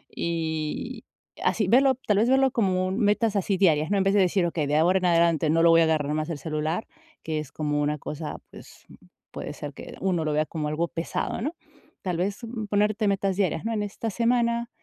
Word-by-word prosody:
Y 160 -2 -3 0.4
así, 210 - +1
verlo 265 +5 +5
tal 210 - +3
vez 225 +4 +3
verlo 265 0 +4
como 185 -5 +1
metas 210 +1 +1
así 195 0 0
diarias, 155 -5 +3
¿no? 205 - +2
En 195 - +2
vez 195 0 +2
de 205 - +4
decir: 185 -1 +2
"Okey, 160 -3 -1
de 150 +1 +1
ahora 180 +4 +4
en 185 - -2
adelante 170 -2 +3
no 165 +1 +3
lo 170 - +7
voy 165 0 +6
a - - +5
agarrar 150 -2 0
más 155 +1 -2
el 165 - -3
celular", 155 +6 -2 0.4
que 155 -1 -2
es 150 -2 -7
como 150 -1 -1
una 150 +1 0
cosa, 150 +2 -6
pues - - -14 0.5
puede - - -6
ser - - -7
que - - -10
uno 180 -4 0
lo 155 - 0
vea 155 +1 +1
como 155 -1 -4
algo 155 +3 -1
pesado, 165 +6 -3
¿no? 300 +8 -3 0.5
Tal 180 -2 -1
vez 195 +3 -1 0.3
ponerte 210 +1 +1
metas 195 -1 0
diarias, 185 -3 -1
¿no? 230 - -1
En 210 -2 -1
esta 205 +2 -4
semana, 235 +1 +1
180 Hz, 215 wpm, -26 LUFS, 155-205 Hz, 0.5 s, lo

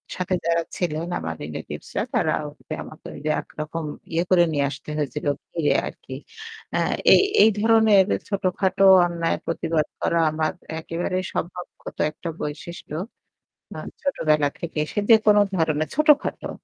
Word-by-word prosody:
সাথে 185 0 -2
যারা 170 0 +2
ছিলেন 165 -1 -2
আমার 80 0 -4
রিলেটিভসরা, 75 +1 -5
তারা - - +2
ওভাবে 150 +1 -9
আমাকে 155 - -12 0.3
একরকম 155 +1 -6 0.3
ইয়ে 170 - +2
করে 180 -2 +6
নিয়ে 145 -2 +1
আসতে 145 +2 -9
হয়েছিলো। 145 0 -2 0.3
ইয়ে 150 - +3
আর - - -6
কি। - - -7 0.6
অ্যা - - +1 0.3
এই - - +7 0.2
এই 220 - +7
ধরনের 220 -3 +5 0.2
ছোটখাটো 195 0 +1 0.2
অন্যায়ের 170 -1 -1
প্রতিবাদ 165 -2 0 0.2
করা 170 - +1
আমার 155 0 0 0.3
একেবারেই 175 +3 -2
স্বভাবগত 180 +1 -6
একটা 165 +2 -7
বৈশিষ্ট্য 150 +1 -6 0.8
আ - - -5 0.2
ছোটবেলা 155 - +2
থেকেই। 160 -3 -2
সে - - 0
যেকোন 215 -2 +6 0.2
ধরনের 155 -2 +1
ছোটখাটো। 300 0 +3
170 Hz, 135 wpm, -23 LUFS, 155-190 Hz, 0.8 s, এই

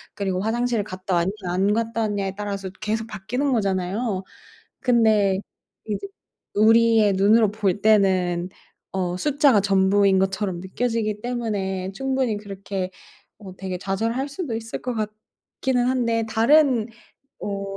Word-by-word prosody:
그리고 190 -2 -1
화장실을 230 0 0
갔다 185 -1 -3
왔냐 170 +3 +1 0.2
안 195 +3 +2
갔다 230 0 -1
왔냐에 200 -3 -1
따라서 200 -2 -4
계속 220 +1 -2
바뀌는 230 +7 -2
거잖아요. 195 0 -1 0.6
근데 220 -6 +3 0.5
이제 215 - -3 0.5
우리의 225 -1 +5
눈으로 210 +2 +4
볼 205 -2 -1
때는 185 -4 +3 0.4
어 180 -2 -1
숫자가 285 - +3
전부인 195 0 +3
것처럼 190 -2 -1
느껴지기 215 +1 -2
때문에 200 -6 -3
충분히 260 -2 -1
그렇게 195 -2 -5 0.5
어 190 -4 -10
되게 185 -1 -4
좌절할 225 +8 -2
수도 285 -6 -4
있을 225 0 -5
것 250 -1 -3
같기는 220 +3 -3
한데 230 -3 +1
다른 245 0 +4 0.6
어 200 -1 -4
210 Hz, 285 characters per minute, -23 LUFS, 190-230 Hz, 0.6 s, 우리의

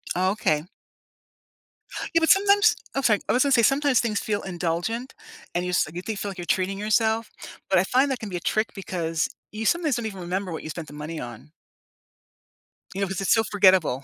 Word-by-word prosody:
Oh, 185 +2 +2
okay. 155 -8 0 1.5
Yeah, 330 - +6
but 320 - +2
sometimes 405 +4 +5 0.2
Oh, 275 - +1
sorry. 220 -6 +3
I - - +4
was 250 - +4
gonna 280 - +1
say 240 -3 +5
sometimes 275 +1 +3
things 215 -4 0
feel 205 -3 -2
indulgent, 180 +7 -3 0.4
and 175 - 0
you - - -2
s 180 - +2
you 175 - -5
think 215 +2 -4
feel 200 - -3
like 190 - -11
you're 175 - -5
treating 190 +2 0
yourself. 220 +1 +1 0.4
But 190 - +4
I - - +3
find 260 +8 +2
that 255 - -2
can 215 - -6
be 180 - -5
a - - -4
trick 215 +5 -1
because 165 -5 -2 0.2
you 215 +1 -5
sometimes 320 -1 +2
don't 235 -1 -3
even 195 -3 -7
remember 185 +2 -3
what 160 - -5
you - - -6
spent 160 0 -6
the - - -12
money 150 +2 -6
on. 120 +4 -9 1.4
You 195 - -3
know, 195 - +1
'cause 190 +1 -4
it's 195 - +3
so 225 -1 +3
forgettable. 185 - +3
200 Hz, 220 wpm, -25 LUFS, 175-235 Hz, 1.5 s, Yeah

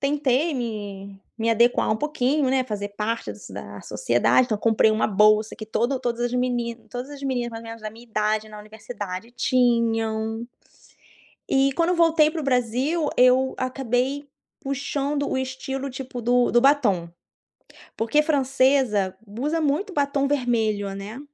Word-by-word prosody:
tentei 285 +2 +1
me 200 -5 -6 0.2
me 230 +1 +1
adequar 235 +1 +3
um 215 - +2
pouquinho, 290 0 0
né, 260 0 +2
fazer 205 -4 -4
parte 210 - -3
das 105 - -12
da 100 +1 -8
sociedade. 120 - +2
Então, 215 - -1
comprei 220 0 +3
uma 215 - +1
bolsa 215 +1 +3
que 215 - -8
todo 240 +5 0
todas 240 -1 -3
as 240 - 0 0.6
todas 250 +3 -6
as 285 -1 -9
meninas 250 -3 -1
mais 225 0 -8
ou - - -11
menos 225 -1 -9
da 215 - -4
minha 230 +2 -14
idade 215 0 -1
na 210 -1 -10
universidade 215 0 -7
tinham. 230 -2 +1 1.0
E 275 0 +3
quando 335 +1 +1
eu 360 - +1
voltei 325 -2 +4
para 320 0 -4
o - - -5
Brasil, 265 +5 0
eu 255 +1 +4
acabei 260 +2 -1 0.3
puxando 280 +1 -2
o - - -1
estilo 260 +1 -4
tipo 255 -1 -7
do 245 +1 +3
do 240 - +5
batom. 240 -11 +3 0.9
Porque 230 +7 +2
francesa 260 - +2
usa 285 +11 -2
muito 310 +7 0
batom 280 -2 +1
vermelho, 225 -7 0
né? 205 +6 -7
245 Hz, 155 wpm, -24 LUFS, 215-275 Hz, 1.0 s, do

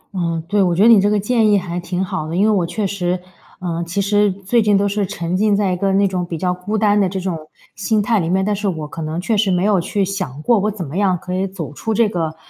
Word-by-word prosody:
嗯， 170 -3 -1
对， 205 +2 +2
我 180 -2 +2
觉 190 - +3
得 - - +6
你 220 -4 +7
这 205 - +2
个 210 0 +2
建 220 +1 +2
议 205 - +5
还 175 -2 -3
挺 180 +1 -3
好 155 -3 -4
的。 165 - -4
因 190 - +2
为 220 - +4
我 195 -4 +2
确 210 +4 -2
实 180 -2 -1 0.4
呃， 170 -2 -3
其 170 +4 -3
实 205 +1 +2
最 200 +5 0
近 205 -2 +3
都 200 +1 +1
是 200 -1 -1
沉 175 -2 -3
浸 210 +2 +2
在 200 -2 +1
一 - - 0
个 195 +2 0
那 200 +1 +3
种 185 -2 -2
比 170 -1 -5
较 180 +2 0
孤 180 +4 -3
单 210 -1 +3
的 190 - +2
这 190 +1 -3
种 185 -2 -2 0.4
心 215 +2 0
态 215 +1 +1
里 165 -2 -1
面， 190 +1 +1
但 210 0 0
是 205 +1 -3
我 160 -5 -3
可 160 - -8
能 155 +1 -3
确 220 +5 0
实 205 -1 +2
没 180 -1 +1
有 200 -3 +3
去 195 +3 -1
想 185 -8 -4
过， 235 +2 +3
我 210 +2 0
怎 200 -4 -5
么 150 +5 -6
样 195 -3 +2
可 180 +2 -7
以 190 +1 0
走 180 -6 -7
出 220 +9 -3
这 230 0 +3
个 165 -5 -3
190 Hz, 315 characters per minute, -19 LUFS, 175-205 Hz, 0.4 s, 你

